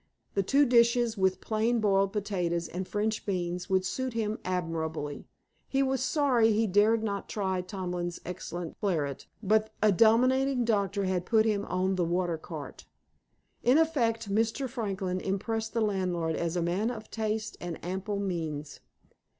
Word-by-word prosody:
The 200 Hz, -, +2 dB
two 275 Hz, +9 st, +4 dB
dishes, 235 Hz, -1 st, +4 dB
with 190 Hz, -2 st, +1 dB
plain 225 Hz, +2 st, +1 dB
boiled 195 Hz, -2 st, +2 dB
potatoes 180 Hz, -5 st, -1 dB
and 185 Hz, +1 st, -5 dB
French 215 Hz, +1 st, -1 dB
beans, 180 Hz, -2 st, -2 dB
would 190 Hz, -1 st, +2 dB
suit 260 Hz, +6 st, -2 dB
him 220 Hz, -1 st, -1 dB
admirably. 160 Hz, -5 st, -3 dB, 0.4 s
He 270 Hz, 0 st, +1 dB
was 265 Hz, -1 st, 0 dB
sorry 260 Hz, -6 st, +3 dB
he 220 Hz, +2 st, +2 dB
dared 215 Hz, +3 st, +3 dB
not 200 Hz, -2 st, -3 dB
try 190 Hz, -3 st, -1 dB
Tomlin's 180 Hz, -2 st, -4 dB
excellent 175 Hz, -1 st, -6 dB
claret, 155 Hz, -, -1 dB, 0.2 s
but 215 Hz, +2 st, +3 dB
a 215 Hz, -, +4 dB
dominating 250 Hz, +5 st, +4 dB
doctor 200 Hz, -3 st, +1 dB
had 185 Hz, -2 st, 0 dB
put 220 Hz, -2 st, +4 dB
him 210 Hz, -2 st, +1 dB
on 185 Hz, +1 st, 0 dB
the 180 Hz, -, +2 dB
water 170 Hz, -1 st, 0 dB
cart. -, -, -8 dB, 0.8 s
In 250 Hz, +4 st, +4 dB
effect, 230 Hz, -10 st, +1 dB
Mr. 225 Hz, +5 st, +1 dB
Franklin 195 Hz, -7 st, -2 dB
impressed 220 Hz, +3 st, -2 dB
the 230 Hz, -, +1 dB
landlord 180 Hz, -6 st, 0 dB
as 170 Hz, 0 st, -2 dB
a 175 Hz, -, +1 dB
man 185 Hz, +7 st, 0 dB
of 220 Hz, -3 st, -7 dB
taste 215 Hz, -1 st, -2 dB
and 175 Hz, -2 st, -4 dB
ample 190 Hz, +3 st, -3 dB
means. 160 Hz, -6 st, -3 dB
200 Hz, 155 wpm, -29 LUFS, 180-225 Hz, 0.8 s, two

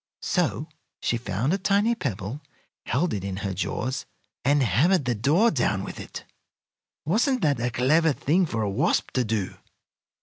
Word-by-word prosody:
So -, -, 0 dB, 0.3 s
she 120 Hz, -, 0 dB
found 115 Hz, -, -1 dB
a 195 Hz, -, 0 dB
tiny 200 Hz, +4 st, +2 dB
pebble, 120 Hz, -, -4 dB, 0.5 s
held 165 Hz, +7 st, +1 dB
it 100 Hz, -3 st, -3 dB
in 95 Hz, -1 st, -4 dB
her 100 Hz, -, -1 dB
jaws, 130 Hz, +8 st, -3 dB, 0.4 s
and 145 Hz, +1 st, +3 dB
hammered 140 Hz, -, +3 dB
the 120 Hz, -, +1 dB
door 150 Hz, -, +3 dB
down 110 Hz, -, 0 dB
with -, -, -7 dB
it. -, -, -8 dB, 0.8 s
Wasn't 245 Hz, -, +2 dB
that 145 Hz, -5 st, +2 dB
a 120 Hz, +1 st, 0 dB
clever 155 Hz, +7 st, +3 dB
thing 165 Hz, +6 st, +1 dB
for 115 Hz, -6 st, -2 dB
a -, -, 0 dB
wasp -, -, +1 dB
to 125 Hz, -, +1 dB
do? 110 Hz, -4 st, -2 dB
130 Hz, 165 wpm, -25 LUFS, 110-170 Hz, 0.8 s, and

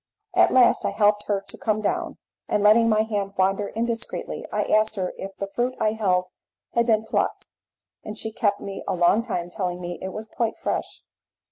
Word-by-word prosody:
At -, -, +5 dB
last 255 Hz, -2 st, +5 dB
I -, -, +1 dB
helped 210 Hz, -1 st, +2 dB
her 200 Hz, -2 st, +1 dB
to -, -, -9 dB
come 215 Hz, -2 st, 0 dB
down, 215 Hz, -, -2 dB, 0.3 s
and 205 Hz, -, +1 dB
letting 225 Hz, +2 st, +6 dB
my 215 Hz, 0 st, +4 dB
hand 205 Hz, -3 st, -2 dB
wander 195 Hz, +2 st, +2 dB
indiscreetly, 230 Hz, +1 st, -4 dB
I -, -, +1 dB
asked 215 Hz, 0 st, +2 dB
her 185 Hz, -2 st, -2 dB
if 195 Hz, 0 st, -8 dB
the 200 Hz, -, -2 dB
fruit 245 Hz, +6 st, -2 dB
I 215 Hz, -, +2 dB
held 190 Hz, -5 st, +1 dB, 0.5 s
had 235 Hz, 0 st, +2 dB
been 220 Hz, -1 st, +3 dB
plucked, -, -, -1 dB, 0.5 s
and 210 Hz, 0 st, -6 dB
she 220 Hz, -, -3 dB
kept 205 Hz, -2 st, +1 dB
me 195 Hz, -1 st, -6 dB
a -, -, 0 dB
long 175 Hz, +5 st, +4 dB
time 175 Hz, -6 st, -4 dB
telling 180 Hz, -1 st, -3 dB
me 175 Hz, -1 st, -5 dB
it 190 Hz, -, -4 dB
was 215 Hz, +3 st, -6 dB
quite 225 Hz, +1 st, -2 dB
fresh. -, -, -3 dB
210 Hz, 200 wpm, -24 LUFS, 195-220 Hz, 0.5 s, letting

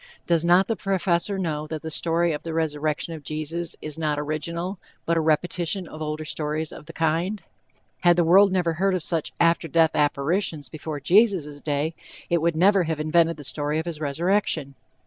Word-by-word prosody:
Does 170 Hz, -2 st, +2 dB
not 175 Hz, +3 st, +5 dB
the 225 Hz, -, -1 dB
Professor 195 Hz, -1 st, 0 dB
know 155 Hz, -5 st, -2 dB
that 155 Hz, 0 st, -6 dB
the 160 Hz, -, -5 dB
story 170 Hz, +1 st, +2 dB
of 150 Hz, -, -3 dB
the 165 Hz, -1 st, -5 dB
resurrection 155 Hz, 0 st, -1 dB
of 160 Hz, -, -8 dB
Jesus 155 Hz, +3 st, -3 dB
is 155 Hz, +1 st, -3 dB
not 150 Hz, -2 st, 0 dB
original, 170 Hz, +5 st, -3 dB, 0.3 s
but 170 Hz, -, +1 dB
a -, -, +2 dB
repetition 170 Hz, +3 st, 0 dB
of 155 Hz, -, -10 dB
older 155 Hz, 0 st, -3 dB
stories 155 Hz, +1 st, -2 dB
of 150 Hz, -, -11 dB
the -, -, -8 dB
kind? 165 Hz, +6 st, -1 dB, 0.6 s
Had 175 Hz, -1 st, +5 dB
the 175 Hz, -, +3 dB
world 190 Hz, +4 st, +6 dB
never 175 Hz, -3 st, +1 dB
heard 190 Hz, +3 st, +1 dB
of 180 Hz, -, -2 dB
such 165 Hz, -1 st, 0 dB
after 170 Hz, 0 st, +3 dB
death 165 Hz, 0 st, +3 dB
apparitions 150 Hz, +2 st, 0 dB
before 155 Hz, -1 st, -6 dB
Jesus' 170 Hz, -, +2 dB
day, 150 Hz, +2 st, -1 dB, 0.4 s
it 170 Hz, -2 st, +2 dB
would 170 Hz, 0 st, +1 dB
never 190 Hz, +2 st, +4 dB
have 160 Hz, -1 st, -2 dB
invented 165 Hz, +2 st, +2 dB
the 145 Hz, -, -9 dB
story 150 Hz, +2 st, -2 dB
of 160 Hz, -, -2 dB
his 170 Hz, -3 st, -5 dB
resurrection. 155 Hz, -1 st, 0 dB
165 Hz, 190 wpm, -24 LUFS, 155-175 Hz, 0.6 s, world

